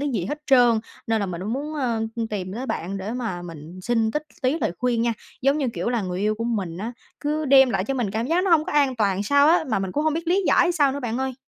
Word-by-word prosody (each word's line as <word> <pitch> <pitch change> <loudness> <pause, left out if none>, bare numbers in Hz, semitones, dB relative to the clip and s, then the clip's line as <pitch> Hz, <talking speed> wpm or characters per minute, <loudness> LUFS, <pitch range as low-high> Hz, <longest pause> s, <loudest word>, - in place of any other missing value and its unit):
cái 290 - -1
gì 220 -10 -1
hết 295 +8 -5
trơn. 245 -4 +5 0.3
Nên 225 -1 +1
là 200 - -1
mình 175 -2 -5
mới 200 +4 -4
muốn, 290 +5 -3
ơ, 255 -6 0 0.2
ưm, 230 -1 -1
tìm 190 -4 -4
tới 250 +4 -4
bạn 195 -4 -3
để 205 +4 -4
mà 225 -8 -3
mình 165 +1 -9
xin 225 +1 +1
tích 300 - -2 0.2
tí 265 +5 +1
lời 175 - -1
khuyên 245 -2 +1
nha, 235 0 +1 0.3
giống 275 +3 +3
như, 280 - 0
kiểu - - -2
là, 240 -3 0
người 180 -1 -3
yêu 210 +1 +1
của 230 +2 -4
mình 195 -8 -2
á, 225 +4 -4 0.3
cứ 300 +1 -1
đem 265 -2 +6
lại - - 0
cho 270 - -2
mình 235 -6 -1
cảm 225 +3 -2
giác 350 +5 +1
nó 385 - +1
hông 320 -2 +5
có - - -5
an 280 -3 +2
toàn 200 -3 +1
sao 285 +7 +4
á, 335 0 +4
mà 215 -5 +1
mình 190 -1 -3
cũng 295 - 0
hông 315 -1 +2
biết 330 +1 -3
lý 385 +3 +3
giải 355 - +4
sao 290 -5 +3
nữa, 285 - -4
bạn 240 -2 -3
ơi. 265 0 -2
240 Hz, 300 wpm, -23 LUFS, 205-285 Hz, 0.3 s, đem